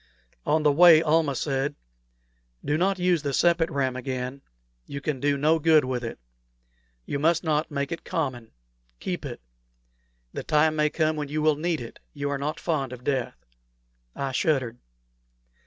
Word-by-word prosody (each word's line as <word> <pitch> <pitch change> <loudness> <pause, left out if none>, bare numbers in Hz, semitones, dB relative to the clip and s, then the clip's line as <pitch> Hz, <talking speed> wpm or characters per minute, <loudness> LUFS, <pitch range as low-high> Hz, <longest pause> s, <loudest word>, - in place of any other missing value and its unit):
On 155 0 +2
the 150 - +5
way, 165 +1 +7
Almah 155 -3 +2
said, 140 +1 -1 0.9
"Do 145 - +1
not 190 +4 +1
use 180 -3 +2
the 140 -1 -2
sepet 170 +2 +3
ram 130 -2 -1
again. 130 +1 -4 0.5
You 140 - -5
can 140 -1 -3
do 145 +1 +1
no 155 +3 +3
good 155 -2 +4
with 125 -1 -2
it. 115 - -5 0.9
You 140 - -3
must 165 +3 +2
not 155 -1 0
make 140 0 -3
it 170 - -5
common. 130 -8 -3 0.5
Keep - - -4
it. - - -8 0.9
The - - -4
time 155 +1 +2
may 150 0 +2
come 155 0 0
when 150 -1 -3
you 150 +2 -2
will 155 -1 +4
need 165 +1 -1
it: 115 - -9 0.2
you 140 0 -2
are 140 - -2
not 150 +3 -3
fond 140 -7 -1
of 125 -1 -9
death." 130 -3 -2 0.7
I 135 -1 -3
shuddered. 130 -4 0
150 Hz, 170 wpm, -26 LUFS, 135-160 Hz, 0.9 s, way